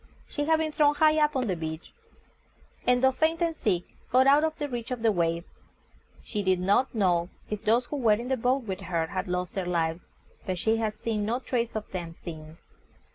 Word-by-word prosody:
She 290 - -2
had 320 +1 +4
been 315 -1 -1
thrown 295 -1 +3
high 310 0 +4
up 300 -1 +1
on 260 -1 +1
the 190 -5 0
beach, 160 0 -6 0.9
and 250 0 +4
though 265 - +6
faint 315 +4 +1
and 335 -2 0
sick, 180 - 0 0.3
got 255 +1 +5
out 285 +3 +6
of 315 0 0
the 295 - -3
reach 240 -4 -5
of 250 -3 -4
the 225 - +5
waves. 170 -2 0 0.8
She 210 - -3
did 185 -2 +2
not 200 +8 +2
know 180 -4 +2 0.2
if 210 - -3
those 235 +3 +3
who 290 - -4
were 230 -5 +4
in 235 +4 -2
the 265 - +2
boat 255 +2 +1
with 190 -4 -4
her 170 -4 -1
had 185 +3 -4
lost 180 0 -2
their 190 -2 -3
lives, 165 -1 -1 0.4
but 185 -1 -3
she 220 +5 +1
had 215 -1 -1
seen 220 -2 -2
no 225 +4 0
trace 240 -3 -2
of 215 -1 -5
them 170 -3 -5
since. 160 -1 -10
220 Hz, 220 wpm, -27 LUFS, 180-265 Hz, 0.9 s, though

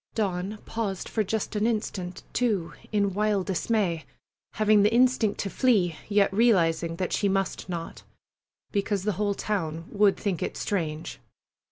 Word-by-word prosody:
Dawn 195 -1 -1
paused 210 -5 -3
for 220 - 0
just 215 +2 -2
an 210 +2 +2
instant, 190 -5 -3
too, 210 -9 0 0.2
in 200 -2 +1
wild 205 -1 +1
dismay, 190 -4 0 0.5
having 215 -1 +4
the 210 +2 +4
instinct 240 -3 +3
to 200 - -3
flee, 200 -10 +2
yet 200 -2 +3
realizing 170 -7 +3
that 185 +1 -2
she 205 - +2
must 195 0 -1
not, 170 -2 -5 0.7
because 200 -1 0
the 210 - +1
whole 205 -1 +1
town 165 -7 -2
would 205 -1 +3
think 195 -6 -2
it - - -3
strange. 160 -5 -3
200 Hz, 150 wpm, -27 LUFS, 180-215 Hz, 0.7 s, having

